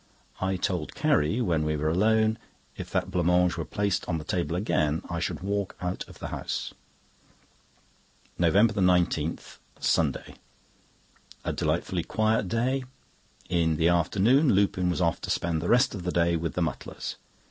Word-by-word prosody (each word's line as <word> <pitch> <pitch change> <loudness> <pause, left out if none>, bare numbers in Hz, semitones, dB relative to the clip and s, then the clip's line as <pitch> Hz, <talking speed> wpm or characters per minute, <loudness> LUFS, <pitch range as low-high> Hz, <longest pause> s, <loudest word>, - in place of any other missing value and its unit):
I 95 0 0
told 90 -3 -2
Carrie, 80 +12 +2
when 85 -8 +1
we 75 0 0
were 75 +1 -1
alone, 110 +6 +2 0.4
if - - -7
that 95 - -1
blanc 90 -3 0
mange 90 0 +3
were 85 - -3
placed 100 -2 -1
on 80 - 0
the 75 - -6
table 85 +1 -2
again 80 -5 0
I 85 - -2
should - - -3
walk 100 0 -2
out 90 +1 -3
of - - -14
the - - -6
house. - - -4 1.7
NOVEMBER 100 +5 +3
19, 90 -3 +2 0.4
Sunday.—A - - -4
delightfully - - -1
quiet 110 -2 +1
day. 125 +7 0 0.6
In 85 -3 +1
the 80 +2 +3
afternoon 105 - +3
Lupin 95 -2 +2
was 90 - -1
off 85 -3 +1
to - - -6
spend 85 -2 0
the 85 - -2
rest 125 +2 +4
of 100 - -5
the 90 0 -2
day 85 0 +2
with 85 0 -3
the 90 - +1
Mutlars. 75 -5 -5
90 Hz, 160 wpm, -27 LUFS, 85-100 Hz, 1.7 s, rest